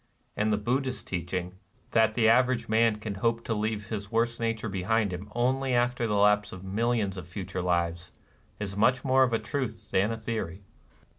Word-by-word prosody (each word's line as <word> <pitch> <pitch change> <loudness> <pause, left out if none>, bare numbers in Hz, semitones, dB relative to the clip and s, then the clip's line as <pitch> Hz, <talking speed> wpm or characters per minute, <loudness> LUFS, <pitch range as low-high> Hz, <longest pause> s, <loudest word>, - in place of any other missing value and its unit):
And 105 +1 +1
the 105 - +2
Buddhist 130 +5 -1
teaching, 90 0 -3 0.4
that 110 -1 +3
the 115 -2 +4
average 125 0 +3
man 110 0 +3
can 105 -1 -5
hope 115 +4 0
to 115 - -1
leave 105 -1 -2
his 100 -1 -5
worse 115 +1 +1
nature 115 -1 -1
behind 100 +1 0
him 100 +4 -7
only 130 +2 +1
after 120 -1 +1
the 105 - 0
lapse 105 0 +3
of 95 0 -9
mil 100 +5 -1
lions 105 -5 0
of 90 -2 -7
future 95 0 -5
lives, 85 -1 -1 0.5
is 100 -2 -4
much 125 +6 +2
more 130 0 +4
of 130 -2 +4
a 115 - +2
truth 110 -6 -4
than 100 +4 +2
of - - -1
a - - -4
theory. 105 -5 -4
110 Hz, 200 wpm, -28 LUFS, 95-115 Hz, 0.5 s, the